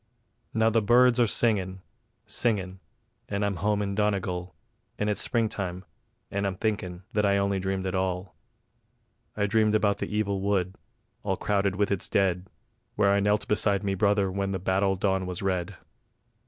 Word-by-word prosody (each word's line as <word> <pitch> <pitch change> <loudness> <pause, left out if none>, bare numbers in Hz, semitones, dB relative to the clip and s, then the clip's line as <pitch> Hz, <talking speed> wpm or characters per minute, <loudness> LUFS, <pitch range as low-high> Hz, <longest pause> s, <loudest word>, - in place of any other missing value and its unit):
Now 110 0 +2
the 115 0 +3
birds 125 +3 +5
are 120 - +5
singin', 95 -5 0 0.4
singin', 100 -4 -1 0.5
and 100 0 -1
I'm 100 -2 -1
home 105 +3 0
in 100 0 -2
Donegal, 95 -3 -1 0.4
And 105 0 0
it's 105 - -1
Springtime, 100 -6 -1 0.5
and 100 0 -1
I'm 95 - -2
thinkin' 95 -4 -3
that 105 - +2
I 100 -1 +3
only 100 0 +1
dreamed 95 0 -2
it 95 - -2
all; 95 0 -2 1.0
I 105 - +2
dreamed 110 0 +2
about 105 -1 +2
that - - -3
evil 100 -2 -1
wood, 95 -2 0 0.5
all 95 -2 -1
crowded 100 -2 0
with 100 +1 0
its 100 - -1
dead, 95 -1 +1 0.5
Where 100 -1 +3
I 100 - +3
knelt 105 +1 +1
beside 105 -1 +2
me 100 -1 0
brother 100 0 +2
when 100 +1 -2
the - - 0
battle 95 +1 +1
dawn 95 -1 0
was 90 +1 -3
red. 90 -3 -1
100 Hz, 170 wpm, -27 LUFS, 95-105 Hz, 1.0 s, birds